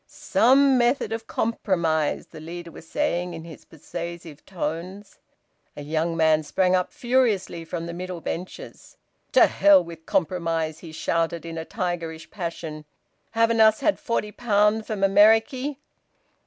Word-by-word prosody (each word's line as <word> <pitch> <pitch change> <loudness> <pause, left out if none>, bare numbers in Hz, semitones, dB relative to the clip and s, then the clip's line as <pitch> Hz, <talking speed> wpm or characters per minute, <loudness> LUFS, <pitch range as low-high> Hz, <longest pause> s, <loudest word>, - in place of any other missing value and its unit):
"Some 265 +2 +3
method 240 0 +1
of 225 0 -5
compromise," 170 -9 0
the - - -12
leader 170 +2 -8
was 160 - -13
saying 180 - -1
in 165 - -8
his 165 -2 -12
persuasive 170 -1 -8
tones. 185 +3 -5 0.6
A 145 - -6
young 160 +3 -1
man 160 -1 +4
sprang 180 +5 +1
up 180 -1 0
furiously 235 -9 0
from 165 0 -5
the 170 - -6
middle 180 0 -6
benches. 185 - -7 0.4
"To - - +7
hell 300 -2 +5
wi' 170 0 -9
compromise!" 165 -2 -1
he 165 - -10
shouted 165 +1 -1
in 165 -1 -6
a 160 0 -5
tigerish 165 -5 -4
passion. 165 -5 -6 0.5
"Haven't 230 0 +3
us 220 +1 +5
had 305 +2 +1
forty 210 -3 -2
pound 210 -1 +1
from 215 -3 -4
Ameriky?" 225 +8 +4
175 Hz, 140 wpm, -24 LUFS, 165-220 Hz, 0.6 s, To